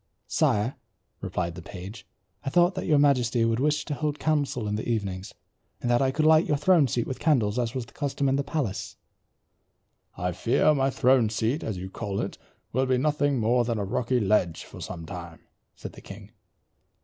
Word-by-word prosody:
"Sire," 105 +5 +1 0.4
replied 85 0 -3
the 85 - -9
page, 95 +2 -9 0.4
"I 135 - -2
thought 175 +4 +4
that - - -4
your 155 -3 +4
majesty 125 -5 +3
would 115 0 +1
wish 150 +2 +1
to 150 - -3
hold 150 0 -2
council 145 -8 0
in 105 - -2
the 110 - -4
evenings, 100 -4 -3 0.4
and 120 - -1
that 120 - +3
I 135 - +3
could 155 +4 0
light 160 +1 +5
your 150 - +2
throne 155 -1 +4
seat 120 -1 -1
with 130 - -5
candles 125 -8 +2
as 120 -1 -2
was 125 -3 -3
the - - -20
custom 140 -1 -1
in 135 - +2
the 140 - 0
palace." 140 -9 -3 1.2
"I 90 +1 -1
fear 115 - +2
my 135 -2 +2
throne 125 -2 +3
seat, 115 +7 -1
as 105 -4 -3
you 95 +1 -7
call 100 -2 -4
it, - - -4 0.3
will 130 +2 +1
be 130 -1 +2
nothing 145 0 +1
more 120 +2 +2
than 115 -1 -1
a 100 - -2
rocky 125 +5 0
ledge 95 -6 +1
for - - -12
some 85 -3 -6
time," 85 -2 -8 0.3
said - - -9
the - - -13
king. 100 +1 -11
120 Hz, 200 wpm, -26 LUFS, 105-140 Hz, 1.2 s, light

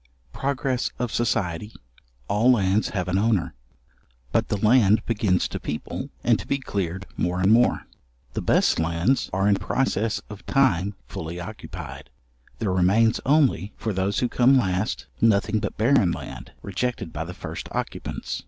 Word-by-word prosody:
Progress 135 -2 -1
of 120 -2 -3
society; 105 -3 -1 0.5
all 115 +5 +4
lands 100 -2 +2
have 90 -3 -2
an 90 +1 +1
owner. 105 -3 +1 0.8
But - - +1
the 105 - -1
land 110 0 +4
begins 105 -5 +1
to - - -4
people, 75 - -5
and - - +3
to - - -8
be 140 - +1
cleared 100 -7 -3
more 90 +1 0
and 95 +3 +3
more. 120 +2 +4 0.5
The - - -2
best - - +3
lands 85 +10 +1
are 95 +2 +1
in 100 -1 +4
process 110 +1 0
of 105 -1 -10
time 105 -8 +2
fully 80 +5 -6
occupied. 85 -7 -8 0.5
There 105 -4 -1
remains 100 +6 +3
only 135 - +3
for 110 - -2
those 95 +2 0
who 125 - +2
come 125 +3 +4
last, 95 -2 -1 0.2
nothing 110 -1 +3
but - - -4
barren 110 -5 +4
land, - - -7
rejected 100 -2 -3
by 80 - -3
the 90 +2 -8
first - - -7
occupants. - - -4
105 Hz, 155 wpm, -24 LUFS, 90-120 Hz, 0.8 s, all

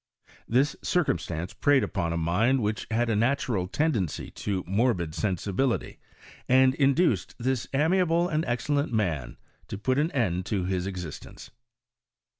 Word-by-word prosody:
This 135 +5 +2
circumstance 85 - -1
preyed 145 -2 +3
upon 85 -1 -2
a 85 - -1
mind 110 +10 +2
which 105 +1 -2
had 120 +1 +1
a 115 - +1
natural 120 -4 0
tendency 110 - -1
to 95 -3 -3
morbid 95 -5 0
sensibility, 100 +7 -1 0.5
and 130 0 +5
induced 140 +5 +2
this 130 0 -1
amiable 170 +4 +2
and 155 -2 0
excellent 135 +4 -1
mao 80 - -1 0.3
to - - -5
put 130 +6 0
an 155 +2 +2
end 95 - -1
to 100 -3 -1
his 95 0 -1
existence. 90 -5 -8
115 Hz, 135 wpm, -27 LUFS, 90-135 Hz, 0.5 s, and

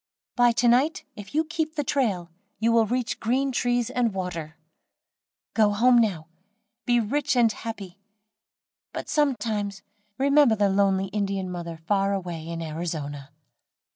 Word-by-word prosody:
"By 245 -1 +5
to 240 +1 +2
night, 260 +7 +2
if 205 +3 -10
you 315 - +3
keep 320 -1 -3
the 295 - -1
trail, 200 -12 -1 0.3
you 230 +1 +2
will 230 -1 +4
reach 245 +1 -2
green 265 +4 0
trees 245 -1 0
and 240 -5 0
water. 165 -4 -5 1.0
Go 210 -2 +3
home 240 +3 +5
now, 190 -9 0 0.6
be 240 -1 +4
rich 270 +6 0
and 235 -2 +4
happy; 200 -5 -7 0.9
but - - -5
some 295 -3 +2
times 205 -4 -3 0.3
remember 280 -3 +4
the 205 -1 +2
lonely 195 -1 +2
Indian 195 -2 -2
mother 170 -2 -6
far 195 +4 0
away 175 -4 -4
in 165 0 -4
Arizona." 155 -3 -5
210 Hz, 145 wpm, -25 LUFS, 180-245 Hz, 1.0 s, By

